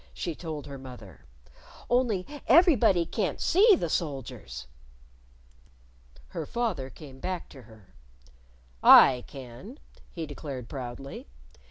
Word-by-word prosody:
she 170 - -3
told 155 -3 -7
her 140 -1 -9
mother. 125 -11 -12 0.6
"Only 240 -7 +1 0.2
everybody 255 - +5
can't 185 -4 -2
see 405 +4 +5
the 175 - -2
soldiers." 125 - -4 1.6
Her 160 -3 -5
father 220 - -2
came 135 -2 -13
back 180 +3 -4
to 135 - -13
her. 110 -3 -18 0.9
"I 125 -2 +8
can," 135 - -11 0.3
he 165 -2 -5
declared 140 -4 -7
proudly. 130 - -7
145 Hz, 110 wpm, -28 LUFS, 130-185 Hz, 1.6 s, I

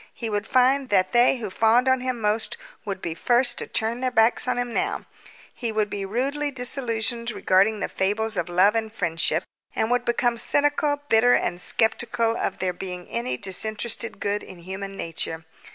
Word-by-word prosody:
He 230 -2 -4
would 205 0 -2
find 260 +1 +3
that 190 -2 +2
they 240 +2 +4
who 215 -5 -5
fawned 225 +5 +3
on 260 -1 +3
him 255 -1 -2
most 215 +1 0 0.3
would 195 -2 -5
be 165 - -2
first 245 +9 +1
to - - -3
turn 230 +2 -1
their 255 - +1
backs 225 +1 +2
on 250 -1 0
him 245 -1 -2
now. 400 +3 -1 0.5
He 235 -3 -3
would 215 -1 0
be 200 -1 -3
rudely 275 +7 -1
disillusioned 240 -3 -1
regarding 205 0 +2
the - - 0
fables 210 +3 -1
of 180 - -2
love 185 +4 +4
and 220 -1 -2
friendship, 165 -4 0 0.3
and 220 - 0
would 245 0 +2
become 240 0 +1
cynical, 290 +1 +1
bitter, 245 +1 +5
and 175 0 -1
sceptical 230 +1 +1
of - - -2
there 185 -1 -1
being 180 -1 -7
any 125 +2 -2
disinterested 215 - -1
good 205 0 -1
in 180 -2 -12
human 195 +2 -6
nature. 165 -1 -4
225 Hz, 185 wpm, -24 LUFS, 195-245 Hz, 0.5 s, bitter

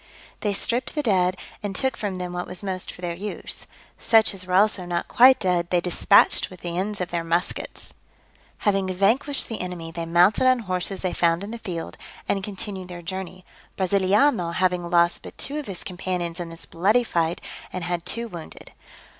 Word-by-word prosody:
They 210 - 0
stripped 240 +7 -1
the 300 - 0
dead, 185 -5 +2 0.2
and 205 -2 -4
took 265 +5 0
from 200 -4 -3
them 180 -1 -4
what 180 0 -3
was 180 +2 -7
most 185 -2 -3
for - - -13
their 175 -1 -2
use; 205 +5 -6 0.3
such 220 -1 +4
as 185 -1 -6
were 180 - 0
also 205 -1 +4
not 175 -1 -2
quite 260 +2 +7
dead 180 -3 +1
they 180 - +3
dispatched 180 +3 +4
with 185 -2 -13
the 170 -1 -4
ends 200 +3 -2
of 180 - -3
their 170 -1 -1
muskets. 170 +2 -2 0.7
Having 195 -2 +1
vanquished 245 +9 +2
the 225 - -4
enemy, 175 -2 -5
they 165 0 -5
mounted 180 +9 +4
on 255 0 +5
horses 185 -1 -2
they 185 - 0
found 170 +1 +2
in 205 - -6
the 235 - -6
field, 175 -7 -6 0.3
and 195 - 0
continued 195 -2 -4
their 175 -1 -8
journey; 185 0 -6 0.3
Brasiliano 190 0 +2
having 180 -2 +1
lost 170 0 +3
but - - -11
two 290 +3 -2
of 295 - -7
his 190 -3 -5
companions 180 -2 -3
in 175 -1 -4
this 165 0 -9
bloody 210 +9 +2
fight, 170 -6 0 0.3
and 185 - -4
had 175 -1 -2
two 235 +5 -1
wounded. 170 -7 -10
185 Hz, 195 wpm, -24 LUFS, 175-205 Hz, 0.7 s, quite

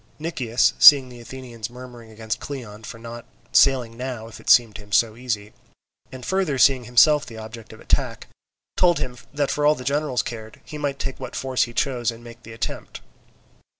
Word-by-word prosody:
Nicias, 130 -7 0
seeing 135 -3 +9
the 120 -1 -12
Athenians 120 -2 -8
murmuring 120 -2 -12
against 110 0 -5
Cleon 115 -7 -8
for 110 - -8
not 115 +1 -9 0.3
sailing 125 -4 +3
now 125 -2 -6
if 115 - -12
it - - -7
seemed 115 -4 +5
to - - -11
him 100 0 -18
so 110 +1 +3
easy, 110 -4 -4 0.6
and 130 -2 -9
further 190 -7 0
seeing 130 -1 +4
himself 145 +5 +5
the 115 - -10
object 110 0 -10
of 110 - -13
attack, - - -1 0.5
told 175 -2 +4
him 125 -1 -4 0.2
that 145 -1 -1
for 150 - -1
all 150 +1 +5
that 125 - -9
the - - -7
generals 145 -4 0
cared, 110 -2 -8
he 150 - -8
might 140 -2 -2
take 135 -1 -5
what - - -7
force 130 -1 0
he 120 - -11
chose 125 -4 0
and 115 0 -7
make 120 0 -12
the 115 - -12
attempt. 115 - -6
120 Hz, 200 wpm, -23 LUFS, 115-135 Hz, 0.6 s, seeing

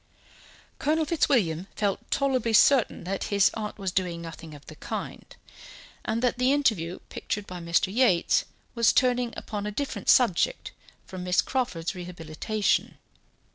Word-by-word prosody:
Colonel 315 +2 +1
Fitzwilliam 200 - +1
felt 200 -2 -2
tolerably 260 -5 +1
certain 255 +2 +4
that 190 +2 -3
his 200 -1 +3
aunt 210 -1 -5
was 195 -3 -3
doing 180 -2 -1
nothing 165 -2 -9
of 145 - -15
the - - -11
kind, - - -7 0.7
and 230 +2 -2
that 250 0 +1
the 255 +1 +3
interview 215 - +1
pictured 205 -1 -4
by 180 -2 -8
Mr. 170 +3 0
Yates 215 -8 +3 0.3
was 235 -2 +3
turning 250 -2 +2
upon 210 -1 -5
a - - -3
different 280 +6 -3
subject 245 - +3 0.3
from 185 -1 -7
Miss 180 0 +1
Crawford's 180 -11 -2
rehabilitation. 180 +3 -2
205 Hz, 140 wpm, -26 LUFS, 175-250 Hz, 0.7 s, certain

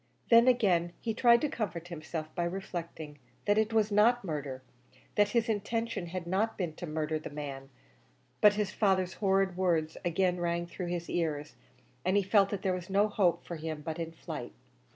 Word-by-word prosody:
Then 230 +1 +8
again 185 -9 +3
he 225 - -2
tried 235 +1 +5
to 300 - +2
comfort 190 - -4
himself 160 -1 -6
by 175 -1 -1
reflecting 170 -5 -6 0.3
that 205 +1 +3
it 220 +1 +1
was 220 -1 +2
not 225 +4 +4
murder 145 -5 -4 0.5
that 205 0 +3
his 235 +1 +1
intention 225 -2 -2
had 175 0 -5
not 200 +6 0
been 175 -5 -2
to 175 - -6
murder 155 0 -2
the - - -7
man; 140 -2 -6 0.7
but 210 -1 +7
his 205 -2 -1
father's 190 -4 +1
horrid 195 -2 +2
words 165 -4 0
again 180 +1 +1
rang 170 0 -1
through 175 +1 -6
his 175 -1 -3
ears, 155 -3 -2 0.5
and 185 +3 +2
he 200 - +3
felt 195 0 +4
that 200 -2 -4
there 190 - +1
was 180 -1 -5
no 200 +2 +3
hope 190 -4 +1
for 170 - -5
him 155 -1 -5
but 160 +1 -4
in 165 -1 -3
flight. 165 - -7
180 Hz, 190 wpm, -31 LUFS, 165-205 Hz, 0.7 s, Then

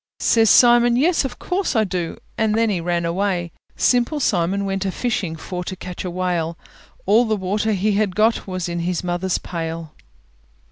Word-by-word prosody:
Says 225 -2 +3
Simon, 240 +1 +6
"Yes, 310 +4 +2
of 245 -2 -5
course 370 -5 -2
I 220 - +4
do!" 180 -4 -3 0.2
And 215 -1 +1
then 225 -1 +2
he 180 -4 -1
ran 170 0 -1
away. 175 0 -1 0.2
Simple 250 +5 +2
Simon 200 -4 0
went 195 0 -2
a 195 - -1
fishing 195 -8 -2
For 180 +2 -6
to 185 - -5
catch 180 -1 -7
a 185 - -3
whale: 175 -2 -2 0.5
All 220 +5 +4
the 220 -1 0
water 210 +3 -1
he 205 +2 +1
had 205 -2 0
got 220 +1 +2
Was 185 -2 -3
in 170 0 -3
his 175 +1 -2
mother's 175 +1 -1
pail. 165 -2 -5
190 Hz, 185 wpm, -21 LUFS, 175-220 Hz, 0.5 s, Simon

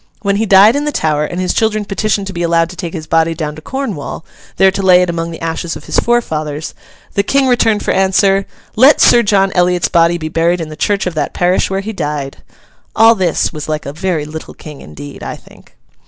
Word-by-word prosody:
When 200 -1 +1
he 220 +1 -1
died 200 +5 +6
in 290 +1 -1
the 295 - -1
Tower, 150 - 0
and 175 +4 -5
his 185 -1 -1
children 215 -2 0
petitioned 200 0 -1
to 195 - -6
be 175 - -4
allowed 170 0 +1
to - - -11
take 175 -2 -5
his 160 -2 -6
body 165 +1 +1
down 150 -2 -4
to 155 - -11
Cornwall, 200 - -5 0.3
there 190 0 +5
to 195 - -4
lay 180 -1 +5
it 180 - -1
among 165 0 -3
the 165 - -8
ashes 165 0 -4
of 155 - -10
his - - +1
forefathers, 155 -11 -2 0.4
the 200 - +2
King 275 +7 +1
returned 230 -4 +2
for - - 0
answer, 195 +1 +2 0.3
'Let 265 +6 +5
Sir 240 - +6
John 195 -3 +2
Eliot's 180 -2 +1
body 170 0 +3
be 155 -2 -5
buried 165 +2 0
in 160 -2 -5
the 155 - -8
church 200 +5 -1
of 180 - -3
that 150 -2 -3
parish 180 +1 +1
where 195 0 -2
he 220 +2 -6
died.' 145 -6 -4 0.6
All 225 +1 +6
this 185 -7 -1
was 155 0 -7
like 155 -1 -3
a 140 - -6
very 165 -2 -2
little 155 +1 -9
King 150 -2 -11
indeed, 140 - -11
I - - -5
think. - - -19
180 Hz, 230 wpm, -14 LUFS, 160-200 Hz, 0.6 s, died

